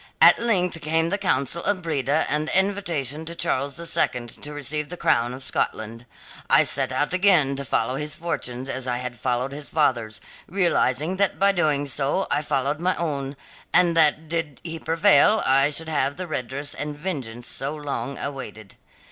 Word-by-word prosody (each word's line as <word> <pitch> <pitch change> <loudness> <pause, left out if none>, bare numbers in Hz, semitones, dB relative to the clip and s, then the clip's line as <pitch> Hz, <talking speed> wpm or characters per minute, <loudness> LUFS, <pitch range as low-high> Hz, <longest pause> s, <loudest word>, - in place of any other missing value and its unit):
At - - +7
length 180 -8 0
came 160 +2 +1
the 200 - 0
council 170 -3 0
of 195 -3 -1
Breda 150 -1 0
and 150 +1 0
the 185 - +3
invitation 170 -8 -2
to 170 +1 -5
Charles 140 -3 -1
the 170 - -6
Second 120 -7 +1
to 150 - -6
receive 145 +1 -3
the 180 - -6
crown 120 -5 +2
of 130 +1 -8
Scotland. 115 -2 -3 0.4
I - - +6
set - - 0
out 150 - 0
again 180 -8 +4
to 140 - -4
follow 130 0 -1
his 150 0 -3
fortunes 130 -6 -4
as 130 -1 -3
I 125 -1 0
had 125 -1 -6
followed 125 +1 -1
his 145 +1 -7
father's, 120 -8 0 0.3
realizing 170 -3 +1
that 200 0 +1
by 200 +1 +4
so - - -9
doing 145 0 +1
I 145 - +2
followed 145 0 -1
my 185 +2 +1
own, 140 -4 -3 0.4
and 175 -1 +4
that 160 0 +3
did 160 -3 -3
he 165 -1 -5
prevail 195 +7 +4
I 135 +2 +4
should 160 +2 -2
have 145 -3 0
the 185 - -5
redress 140 -2 -4
and 150 0 -5
vengeance 130 -9 -4
so 140 +5 -1
long 140 -2 -4
awaited. 110 -7 -7
150 Hz, 180 wpm, -24 LUFS, 135-170 Hz, 0.4 s, At